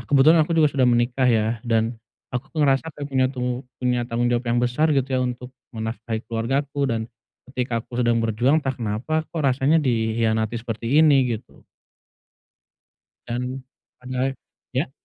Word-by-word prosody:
kebetulan 150 Hz, +4 st, +6 dB
aku 170 Hz, -, -3 dB
juga 155 Hz, -2 st, +5 dB
sudah 130 Hz, -2 st, +3 dB
menikah, 120 Hz, +2 st, +2 dB
ya, 110 Hz, -2 st, +3 dB, 0.2 s
dan 115 Hz, +1 st, +1 dB, 0.4 s
aku, 125 Hz, +1 st, -3 dB
tuh, 155 Hz, -2 st, +2 dB
ngerasa 135 Hz, +2 st, +3 dB
kayak 145 Hz, -1 st, -5 dB
punya 130 Hz, -1 st, +2 dB
tung 125 Hz, -1 st, -3 dB, 0.2 s
punya 125 Hz, -1 st, +1 dB
tanggung 120 Hz, +1 st, 0 dB
jawab 120 Hz, +1 st, 0 dB
yang 120 Hz, +1 st, +2 dB
besar 125 Hz, +6 st, +1 dB
gitu, 135 Hz, 0 st, +1 dB
ya, 130 Hz, -, +2 dB
untuk 125 Hz, +1 st, -5 dB, 0.2 s
menafkahi 110 Hz, 0 st, -4 dB
keluargaku 135 Hz, +5 st, -1 dB
dan 115 Hz, -2 st, 0 dB, 0.5 s
ketika 125 Hz, -3 st, -1 dB
aku 125 Hz, 0 st, -4 dB
sedang 120 Hz, -1 st, +2 dB
berjuang 125 Hz, +8 st, +2 dB
entah 135 Hz, -, 0 dB
kenapa, 120 Hz, +7 st, -2 dB
kok, 165 Hz, -, -4 dB
rasanya 135 Hz, +4 st, +3 dB
dikhianati 110 Hz, -2 st, 0 dB
seperti 115 Hz, +3 st, -2 dB
ini, 135 Hz, -6 st, +4 dB
gitu. 115 Hz, +4 st, -18 dB, 1.6 s
Dan, 125 Hz, +2 st, -4 dB, 0.4 s
padahal 130 Hz, +1 st, -2 dB, 0.4 s
ya? 130 Hz, +1 st, -1 dB
125 Hz, 155 wpm, -23 LUFS, 115-135 Hz, 1.6 s, kebetulan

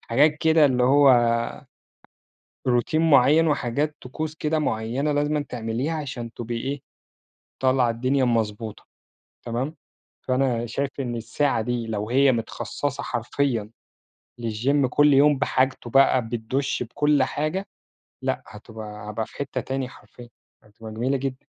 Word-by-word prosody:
حاجات 150 Hz, +6 st, +3 dB
كده 160 Hz, -1 st, +5 dB
اللي 125 Hz, -2 st, +1 dB
هو 140 Hz, +2 st, +6 dB, 1.6 s
روتين 155 Hz, +7 st, +2 dB
معيّن 150 Hz, +4 st, +5 dB
وحاجات 145 Hz, +1 st, 0 dB
طقوس 155 Hz, +5 st, -5 dB
كده 155 Hz, 0 st, 0 dB
معيّنة 125 Hz, +3 st, -1 dB
لازمًَا 145 Hz, 0 st, 0 dB
تعمليها 120 Hz, +6 st, -2 dB
عشان 130 Hz, -6 st, -5 dB
تبقي 120 Hz, 0 st, -5 dB
إيه، 135 Hz, +3 st, -4 dB, 0.8 s
طالعة 130 Hz, -2 st, +3 dB
الدنيا 130 Hz, +4 st, +1 dB
مضبوطة. 110 Hz, -2 st, -2 dB, 0.6 s
تمام؟ 125 Hz, +7 st, -3 dB, 0.5 s
فأنا 130 Hz, -2 st, 0 dB
شايف 135 Hz, +4 st, -2 dB
إن 120 Hz, -3 st, -3 dB
الساعة 125 Hz, +2 st, 0 dB
دي 120 Hz, 0 st, -2 dB
لو 105 Hz, 0 st, -3 dB
هي 135 Hz, +1 st, +5 dB
متخصصة 125 Hz, +4 st, -3 dB
حرفيًا 120 Hz, -2 st, -1 dB, 0.7 s
للGym 130 Hz, +5 st, +1 dB
كل 145 Hz, +3 st, +4 dB
يوم 145 Hz, +1 st, +5 dB
بحاجته 130 Hz, -2 st, 0 dB
بقى، 130 Hz, -2 st, +4 dB
بالدُش 120 Hz, +5 st, -2 dB
بكل 145 Hz, +4 st, +1 dB
حاجة 155 Hz, +8 st, -2 dB, 0.6 s
لأ، -, -, -2 dB
هتبقى 105 Hz, -1 st, -9 dB
هابقى 110 Hz, +1 st, -3 dB
في -, -, -18 dB
حتّة 140 Hz, -1 st, -3 dB
تاني 135 Hz, -1 st, -3 dB
حرفيًا، 120 Hz, +1 st, -15 dB, 0.3 s
هتبقى 110 Hz, +1 st, -12 dB
جميلة 130 Hz, +5 st, 0 dB
جدًا. 130 Hz, 0 st, -5 dB
130 Hz, 130 wpm, -24 LUFS, 115-145 Hz, 1.6 s, هو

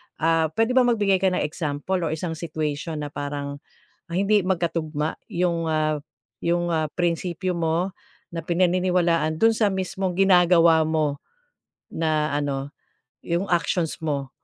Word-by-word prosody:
Ah, 165 Hz, 0 st, +2 dB
puwede 225 Hz, +2 st, +2 dB
ba 250 Hz, -1 st, +4 dB
magbigay 205 Hz, -5 st, +2 dB
ka 190 Hz, -, +2 dB
ng 180 Hz, -, +1 dB
example, 155 Hz, +3 st, -2 dB
or 165 Hz, -, -1 dB
isang 165 Hz, +1 st, -4 dB
situation 155 Hz, -1 st, -3 dB
na 145 Hz, -, -6 dB
parang, 145 Hz, 0 st, -5 dB, 0.5 s
ah, -, -, -3 dB
hindi 200 Hz, -1 st, +3 dB
magkatugma 165 Hz, -4 st, -1 dB, 0.2 s
'yong, 170 Hz, -1 st, 0 dB
ah, 155 Hz, -1 st, 0 dB, 0.4 s
'yong, 175 Hz, 0 st, +1 dB
ah, 155 Hz, -3 st, 0 dB
prinsipyo 175 Hz, +1 st, -1 dB
mo, 170 Hz, +3 st, -1 dB, 0.4 s
na 165 Hz, -, -3 dB
pinaniniwalaan, 175 Hz, -2 st, +1 dB
do'n 225 Hz, 0 st, +4 dB
sa 210 Hz, -3 st, +2 dB
mismong 190 Hz, 0 st, -2 dB
ginagawa 175 Hz, -4 st, +5 dB
mo, 155 Hz, -2 st, -1 dB, 0.7 s
na 155 Hz, -2 st, 0 dB
ano, 145 Hz, -1 st, -2 dB, 0.5 s
'yong 175 Hz, +3 st, -1 dB
actions 170 Hz, -1 st, 0 dB
mo. 140 Hz, -3 st, -2 dB
165 Hz, 135 wpm, -24 LUFS, 155-180 Hz, 0.7 s, ginagawa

